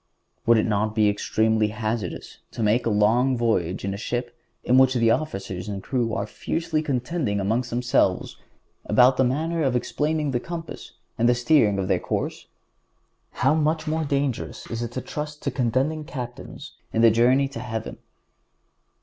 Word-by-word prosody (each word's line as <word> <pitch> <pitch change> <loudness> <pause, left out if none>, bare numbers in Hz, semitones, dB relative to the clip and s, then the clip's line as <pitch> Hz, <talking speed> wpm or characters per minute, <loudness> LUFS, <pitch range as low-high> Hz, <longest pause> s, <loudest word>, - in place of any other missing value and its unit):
Would 115 0 +6
it 110 - +2
not 110 0 0
be 110 -2 +4
extremely 110 +1 +1
hazardous 110 -3 -4
to 115 - -3
make 110 +3 +2
a - - +3
long 120 +5 +3
voyage 95 -6 0
in 100 - -2
a - - -5
ship 120 +2 -4 0.3
in 125 +2 +4
which 130 0 +4
the 115 -2 +3
officers 95 -9 -3
and 100 -2 -5
crew 120 -4 -1
are - - -1
fiercely 165 -2 -2
contending 130 -5 -1
among 110 +5 +1
themselves 125 0 0 0.5
about 125 +4 +5
the 130 - +4
manner 160 +6 0
of 135 -4 +1
explaining 150 +4 -1
the 120 - 0
compass 165 +4 -7 0.3
and 120 +1 +4
of 120 - +3
steering 120 -5 +3
their - - +1
course? - - -3 1.0
How 135 - +5
much 155 +1 +1
more 160 0 -1
dangerous 140 -4 -2
is 115 0 -3
it 120 -1 -4
to 130 - -3
trust 150 +2 -6
to - - -1
contending 135 +5 0
captains 125 -6 -8 0.2
in 115 - +1
the 115 - +7
journey 125 +5 +3
to 125 - -7
heaven! 115 -2 -5
120 Hz, 165 wpm, -24 LUFS, 110-140 Hz, 1.0 s, the